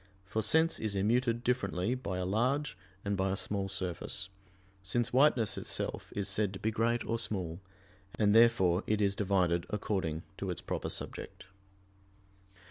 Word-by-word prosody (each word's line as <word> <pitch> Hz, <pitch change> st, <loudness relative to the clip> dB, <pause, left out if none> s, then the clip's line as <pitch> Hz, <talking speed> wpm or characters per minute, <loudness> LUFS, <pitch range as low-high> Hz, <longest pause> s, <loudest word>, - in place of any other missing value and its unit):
For 110 Hz, +3 st, -1 dB
sense 160 Hz, +9 st, +3 dB
is 110 Hz, -2 st, -2 dB
immuted 115 Hz, +4 st, +1 dB
differently 105 Hz, -4 st, 0 dB
by 100 Hz, -8 st, -3 dB
a 90 Hz, -, -1 dB
large 125 Hz, +6 st, 0 dB, 0.3 s
and 100 Hz, 0 st, 0 dB
by 95 Hz, 0 st, 0 dB
a 95 Hz, -, 0 dB
small 100 Hz, 0 st, -2 dB
surface: 95 Hz, +1 st, -3 dB, 0.5 s
since 115 Hz, +6 st, -1 dB
whiteness 130 Hz, -5 st, +4 dB
itself -, -, -3 dB
is 100 Hz, -1 st, +1 dB
said 100 Hz, 0 st, +1 dB
to 95 Hz, -, -7 dB
be 110 Hz, -, 0 dB
great 115 Hz, +1 st, +1 dB
or 115 Hz, 0 st, -1 dB
small, 90 Hz, -7 st, -3 dB, 0.6 s
and 105 Hz, -1 st, +3 dB
therefore 105 Hz, -6 st, +5 dB
it 110 Hz, -1 st, +1 dB
is 100 Hz, -1 st, +2 dB
divided 90 Hz, -4 st, +1 dB
according 95 Hz, -6 st, -2 dB, 0.2 s
to 95 Hz, -, -3 dB
its 90 Hz, -, -2 dB
proper -, -, -3 dB
subject. -, -, -5 dB
100 Hz, 155 wpm, -32 LUFS, 95-115 Hz, 0.6 s, therefore